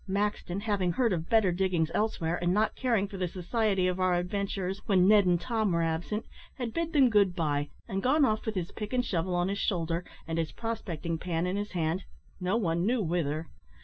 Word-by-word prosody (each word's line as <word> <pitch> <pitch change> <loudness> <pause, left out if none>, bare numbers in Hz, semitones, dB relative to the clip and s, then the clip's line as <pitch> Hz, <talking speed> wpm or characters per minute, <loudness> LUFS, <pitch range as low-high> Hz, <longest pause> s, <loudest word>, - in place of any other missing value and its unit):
Maxton, 200 -1 -1
having 200 -5 0
heard 235 -2 +2
of 165 -1 -3
better 220 -5 +4
diggings 175 -3 +1
elsewhere, 175 -6 0
and 175 0 +2
not 210 +3 +2
caring 230 -6 +1
for 195 -1 -8
the 185 -1 -1
society 190 +1 0
of 180 0 -1
our 185 -1 +3
adventurers 195 +1 -2
when 185 -3 +4
Ned 205 -2 +6
and 175 -1 +3
Tom 220 -1 0
were 170 -1 +2
absent, 165 +7 -2 0.3
had 240 -4 -3
bid 335 +2 -1
them 280 -5 +5
good 200 -4 +4
bye, 145 -4 0 0.2
and 195 -3 -2
gone 280 +5 +4
off 215 -2 -1
with 220 - -1
his 180 -2 -3
pick 210 +2 -6
and 250 -1 +1
shovel 180 -2 -1
on 175 0 +1
his 200 +1 -2
shoulder, 170 -3 -1 0.2
and 165 0 -1
his 160 -1 -1
prospecting 170 -8 -3
pan 170 -1 -1
in 180 +1 -1
his 205 0 -3
hand, 170 +1 -1 0.3
no 185 +4 +1
one 170 -6 0
knew 230 +2 +1
whither. 160 -2 -1
190 Hz, 210 wpm, -29 LUFS, 175-215 Hz, 0.3 s, Ned